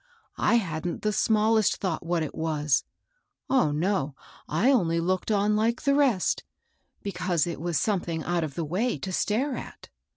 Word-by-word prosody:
I -, -, +3 dB
hadn't 170 Hz, -6 st, -2 dB
the 210 Hz, 0 st, +1 dB
smallest 220 Hz, 0 st, +3 dB
thought 180 Hz, -5 st, -3 dB
what 170 Hz, -1 st, 0 dB
it 155 Hz, -, -5 dB
was, 150 Hz, -3 st, 0 dB, 0.3 s
— -, -, -50 dB
oh, 260 Hz, -, +4 dB
no! 150 Hz, -2 st, 0 dB, 0.3 s
I 200 Hz, -, +3 dB
only 170 Hz, -10 st, +2 dB
looked 185 Hz, +4 st, -1 dB
on 210 Hz, 0 st, +2 dB
like 225 Hz, +3 st, 0 dB
the 280 Hz, -2 st, +3 dB
rest, 270 Hz, -10 st, +2 dB, 0.6 s
because 180 Hz, -5 st, 0 dB
it 170 Hz, -2 st, -5 dB
was 170 Hz, -2 st, 0 dB
something 175 Hz, -6 st, -1 dB
out 175 Hz, -1 st, 0 dB
of 145 Hz, -3 st, -5 dB
the 165 Hz, -, -2 dB
way 205 Hz, +11 st, 0 dB
to 190 Hz, -, -5 dB
stare 250 Hz, +9 st, 0 dB
at. -, -, -9 dB
185 Hz, 170 wpm, -27 LUFS, 165-220 Hz, 0.6 s, oh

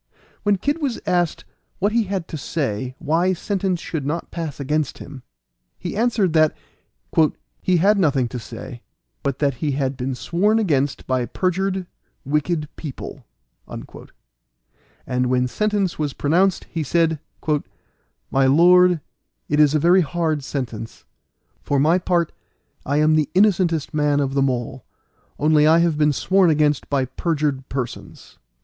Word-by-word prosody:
When 205 Hz, 0 st, +2 dB
Kid 290 Hz, -, -1 dB
was 270 Hz, -5 st, -1 dB
asked 175 Hz, -2 st, 0 dB, 0.3 s
what 205 Hz, +3 st, +1 dB
he 230 Hz, -1 st, +2 dB
had 190 Hz, -3 st, -3 dB
to -, -, -5 dB
say 130 Hz, -5 st, -3 dB
why 165 Hz, +4 st, +1 dB
sentence 190 Hz, 0 st, -1 dB
should 160 Hz, -3 st, -4 dB
not 155 Hz, +5 st, -3 dB
pass 160 Hz, -5 st, -5 dB
against 150 Hz, +1 st, -1 dB
him, 140 Hz, -2 st, -10 dB, 0.6 s
he 175 Hz, -, -5 dB
answered 215 Hz, -6 st, +1 dB
that 155 Hz, -1 st, +3 dB, 1.0 s
"he 185 Hz, -1 st, +2 dB
had 200 Hz, +4 st, +4 dB
nothing 140 Hz, -8 st, +2 dB
to 125 Hz, -, -5 dB
say, 120 Hz, +1 st, -9 dB, 0.4 s
but 140 Hz, -2 st, -2 dB
that 140 Hz, -1 st, +1 dB
he 145 Hz, -3 st, 0 dB
had 135 Hz, -1 st, -1 dB
been 130 Hz, +1 st, -3 dB
sworn 200 Hz, -, +1 dB
against 145 Hz, -, 0 dB
by 130 Hz, -2 st, 0 dB
perjured, 190 Hz, -, -1 dB, 0.4 s
wicked 150 Hz, +2 st, 0 dB
people." 145 Hz, -, -8 dB, 0.4 s
And -, -, -8 dB
when 125 Hz, 0 st, +1 dB
sentence 205 Hz, +3 st, -1 dB
was 145 Hz, -3 st, -1 dB
pronounced, 180 Hz, +6 st, +2 dB
he 165 Hz, -, -2 dB
said, 160 Hz, +1 st, +1 dB, 1.1 s
"My 135 Hz, 0 st, +3 dB
lord, 175 Hz, +3 st, +5 dB, 0.5 s
it 150 Hz, -, +1 dB
is 150 Hz, 0 st, +5 dB
a -, -, +3 dB
very 175 Hz, +4 st, +5 dB
hard 160 Hz, -2 st, -1 dB
sentence. 115 Hz, -5 st, -6 dB, 0.6 s
For 140 Hz, -, 0 dB
my 160 Hz, +6 st, +4 dB
part 175 Hz, -2 st, 0 dB, 0.6 s
I 140 Hz, +2 st, +1 dB
am 155 Hz, +1 st, +4 dB
the 155 Hz, -2 st, +2 dB
innocentest 180 Hz, -6 st, +2 dB
person 150 Hz, -1 st, +1 dB
of 135 Hz, -1 st, -1 dB
them 135 Hz, -1 st, +2 dB
all, 125 Hz, 0 st, -4 dB, 0.5 s
only 150 Hz, 0 st, +4 dB
I 160 Hz, +1 st, +6 dB
have 170 Hz, -2 st, +2 dB
been 150 Hz, 0 st, +4 dB
sworn 185 Hz, +5 st, +3 dB
against 150 Hz, -2 st, +1 dB
by 140 Hz, -2 st, +1 dB
perjured 145 Hz, -1 st, -2 dB
persons." 130 Hz, -3 st, -6 dB
155 Hz, 145 wpm, -21 LUFS, 135-180 Hz, 1.1 s, I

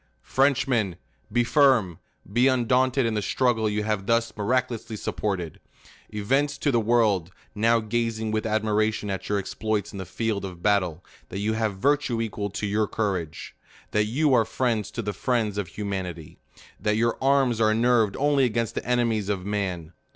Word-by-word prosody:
FRENCHMEN! 130 Hz, -8 st, +1 dB, 0.4 s
Be 120 Hz, +2 st, +3 dB
firm; 120 Hz, -, +3 dB, 0.3 s
be 125 Hz, +3 st, +4 dB
undaunted 130 Hz, +1 st, +2 dB
in 115 Hz, -, 0 dB
the 105 Hz, -, 0 dB
struggle 115 Hz, -1 st, +1 dB
you 105 Hz, 0 st, -1 dB
have 105 Hz, -2 st, -2 dB
thus 115 Hz, 0 st, +1 dB
miraculously 120 Hz, +1 st, -1 dB
supported. 95 Hz, -6 st, -3 dB, 0.5 s
Evince 135 Hz, +7 st, 0 dB
to 145 Hz, -, +1 dB
the 120 Hz, -, +3 dB
world, 105 Hz, -6 st, +2 dB, 0.2 s
now 115 Hz, +2 st, +3 dB
gazing 110 Hz, 0 st, -2 dB
with 110 Hz, 0 st, -1 dB
admiration 110 Hz, -1 st, 0 dB
at 95 Hz, -, -5 dB
your 105 Hz, -, +1 dB
ex 100 Hz, -, -4 dB
ploits 105 Hz, -2 st, -2 dB
in 100 Hz, -, -7 dB
the 95 Hz, -, -5 dB
field 110 Hz, -1 st, -2 dB
of 90 Hz, -3 st, -8 dB
battle, 90 Hz, -5 st, +1 dB, 0.2 s
that 95 Hz, -, -6 dB
you 105 Hz, +2 st, 0 dB
have 110 Hz, -3 st, -1 dB
virtue 140 Hz, 0 st, +1 dB
equal 105 Hz, -2 st, -3 dB
to 100 Hz, +1 st, -4 dB
your 105 Hz, +1 st, +1 dB
courage; 95 Hz, -8 st, -3 dB, 0.4 s
that 105 Hz, 0 st, +2 dB
you 140 Hz, +6 st, +1 dB
are 115 Hz, -, +5 dB
friends 110 Hz, -2 st, -1 dB
to 115 Hz, -, -5 dB
the 105 Hz, 0 st, -3 dB
friends 110 Hz, -5 st, -1 dB
of 100 Hz, -, -3 dB
humanity; 95 Hz, -6 st, -5 dB, 0.4 s
that 105 Hz, +2 st, 0 dB
your 115 Hz, +1 st, +2 dB
arms 135 Hz, -4 st, +2 dB
are 110 Hz, -1 st, +4 dB
nerved 115 Hz, -3 st, +3 dB
only 145 Hz, -1 st, +3 dB
against 115 Hz, -1 st, -1 dB
the -, -, -3 dB
enemies 115 Hz, -4 st, 0 dB
of 95 Hz, -3 st, -2 dB
man. 95 Hz, -5 st, -3 dB
110 Hz, 175 wpm, -25 LUFS, 100-120 Hz, 0.5 s, are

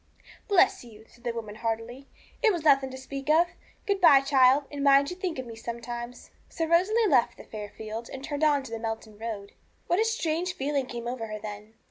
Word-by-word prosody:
'Bless 385 Hz, -7 st, +4 dB
you!' 220 Hz, -2 st, -14 dB
said 240 Hz, -, -22 dB
the 240 Hz, -, -1 dB
woman 225 Hz, -3 st, -6 dB
heartily; 230 Hz, +4 st, -4 dB, 0.3 s
'it 450 Hz, -3 st, +5 dB
was 345 Hz, -5 st, -3 dB
nothing 275 Hz, -3 st, +4 dB
to 260 Hz, -, -8 dB
speak 275 Hz, +2 st, -7 dB
of. 335 Hz, +3 st, +5 dB, 0.4 s
Good 400 Hz, -2 st, 0 dB
bye, 295 Hz, -6 st, +8 dB
child, 270 Hz, 0 st, +4 dB
and 285 Hz, -1 st, -4 dB
mind 280 Hz, +1 st, +5 dB
you -, -, -5 dB
think 365 Hz, -4 st, -3 dB
of 260 Hz, -, -4 dB
me 230 Hz, -1 st, -9 dB
sometimes.' 235 Hz, +1 st, -7 dB, 0.2 s
So 330 Hz, -, -2 dB
Rosalie 375 Hz, +8 st, +3 dB
left 265 Hz, -, +3 dB
the -, -, -11 dB
fair 210 Hz, -1 st, -7 dB
field 220 Hz, +2 st, -7 dB
and 265 Hz, 0 st, -7 dB
turned 290 Hz, +1 st, -3 dB
on 290 Hz, -3 st, +3 dB
to 250 Hz, -, -10 dB
the 225 Hz, -, -4 dB
Melton 220 Hz, -1 st, -5 dB
road. 215 Hz, -3 st, -5 dB, 0.3 s
What 350 Hz, -, +1 dB
a -, -, +4 dB
strange 365 Hz, -6 st, -1 dB
feeling 280 Hz, -4 st, -1 dB
came 235 Hz, -1 st, -6 dB
over 240 Hz, -2 st, -4 dB
her 215 Hz, 0 st, -5 dB
then! 210 Hz, +1 st, -9 dB
265 Hz, 215 wpm, -27 LUFS, 225-315 Hz, 0.4 s, bye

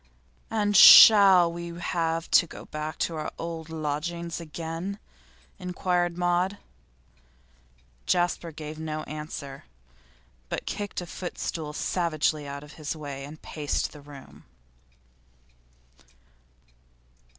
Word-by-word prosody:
'And 205 Hz, -2 st, 0 dB
shall 190 Hz, -5 st, +9 dB
we 170 Hz, 0 st, -7 dB
have 165 Hz, -1 st, -2 dB
to 170 Hz, -, +5 dB
go -, -, -11 dB
back 155 Hz, +1 st, -6 dB
to 170 Hz, -, -1 dB
our 155 Hz, -, -4 dB
old 165 Hz, -1 st, -6 dB
lodgings 160 Hz, +2 st, -4 dB
again?' 165 Hz, +4 st, -6 dB, 0.6 s
inquired 180 Hz, -1 st, -1 dB
Maud. 180 Hz, +2 st, 0 dB, 1.5 s
Jasper 175 Hz, -1 st, 0 dB
gave 155 Hz, 0 st, -8 dB
no 155 Hz, -1 st, -4 dB
answer, 150 Hz, -, -8 dB, 0.8 s
but -, -, -4 dB
kicked 205 Hz, -3 st, -4 dB
a -, -, -6 dB
footstool 165 Hz, -3 st, -5 dB
savagely 155 Hz, -2 st, -1 dB
out 140 Hz, +1 st, -7 dB
of 150 Hz, 0 st, -13 dB
his 150 Hz, +1 st, -3 dB
way 140 Hz, -3 st, -7 dB
and 150 Hz, +3 st, -10 dB
paced 150 Hz, -2 st, -3 dB
the 150 Hz, -, -13 dB
room. 140 Hz, -2 st, -14 dB
165 Hz, 105 wpm, -26 LUFS, 150-175 Hz, 1.5 s, shall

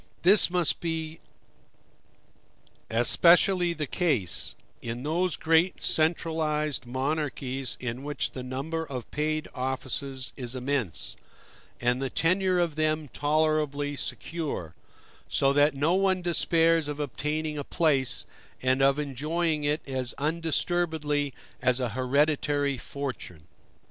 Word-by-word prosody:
This 195 Hz, +3 st, +6 dB
must 175 Hz, -2 st, 0 dB, 2.1 s
especially 175 Hz, +10 st, +5 dB
be 170 Hz, -, 0 dB
the 150 Hz, -1 st, -2 dB
case, 130 Hz, -, 0 dB, 0.3 s
in 120 Hz, +2 st, -5 dB
those 170 Hz, +3 st, 0 dB
great 165 Hz, +3 st, +2 dB
centralized 155 Hz, -3 st, 0 dB
monarchies 135 Hz, -1 st, -2 dB
in 125 Hz, 0 st, -4 dB
which 145 Hz, +1 st, -2 dB
the 130 Hz, -, -6 dB
number 135 Hz, +6 st, -3 dB
of 130 Hz, -6 st, -7 dB
paid 155 Hz, +1 st, -1 dB
offices 130 Hz, 0 st, -3 dB
is 125 Hz, -2 st, -5 dB
immense, 130 Hz, -, -2 dB, 0.6 s
and 125 Hz, +2 st, +1 dB
the 135 Hz, -, -1 dB
tenure 185 Hz, +4 st, +2 dB
of 170 Hz, -3 st, 0 dB
them 155 Hz, -1 st, 0 dB
tolerably 150 Hz, -1 st, +1 dB
secure, 145 Hz, -, -4 dB, 0.6 s
so 135 Hz, 0 st, +3 dB
that 145 Hz, +1 st, +4 dB
no 150 Hz, +5 st, +2 dB
one 190 Hz, -1 st, +2 dB
despairs 165 Hz, -2 st, +3 dB
of 150 Hz, 0 st, -4 dB
obtaining 150 Hz, +2 st, -2 dB
a -, -, -3 dB
place, 135 Hz, -5 st, +1 dB, 0.4 s
and 130 Hz, +1 st, +2 dB
of 135 Hz, +1 st, +4 dB
enjoying 150 Hz, +3 st, -1 dB
it 150 Hz, +1 st, -1 dB
as 130 Hz, -2 st, -1 dB
undisturbedly 160 Hz, -1 st, 0 dB, 0.3 s
as 125 Hz, 0 st, +2 dB
a 125 Hz, -2 st, 0 dB
hereditary 145 Hz, +3 st, +1 dB
fortune. 125 Hz, -, -6 dB
150 Hz, 115 wpm, -27 LUFS, 130-160 Hz, 2.1 s, This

